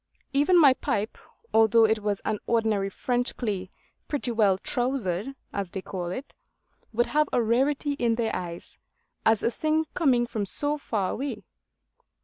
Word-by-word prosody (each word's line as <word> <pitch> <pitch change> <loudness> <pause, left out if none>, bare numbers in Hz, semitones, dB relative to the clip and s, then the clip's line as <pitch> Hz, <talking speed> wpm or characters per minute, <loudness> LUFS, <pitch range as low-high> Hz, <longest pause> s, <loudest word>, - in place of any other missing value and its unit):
Even 295 +6 +4
my 285 -5 +7
pipe, 215 -4 -2 0.4
although 225 0 +6
it 220 0 +1
was 205 -1 -1
an 215 -1 -1
ordinary 220 -4 +1
French 245 +5 -2
clay 195 -6 -3 0.4
pretty 275 -4 -2
well 210 -4 +3
'trousered,' 245 -1 -1 0.2
as 200 -3 -2
they 190 - -5
call 180 -3 -5
it, 255 +11 -6 0.6
would 240 +2 +2
have 300 0 +1
a - - +2
rarity 270 +6 +1
in 240 -5 +1
their 225 -1 -1
eyes, 170 -1 -7 0.5
as 220 -1 +3
a 235 - +2
thing 310 +5 0
coming 255 -8 +3
from 220 -3 -3
so 290 +9 +1
far 205 -8 -1
away. 275 +3 -4
230 Hz, 155 wpm, -26 LUFS, 205-270 Hz, 0.6 s, my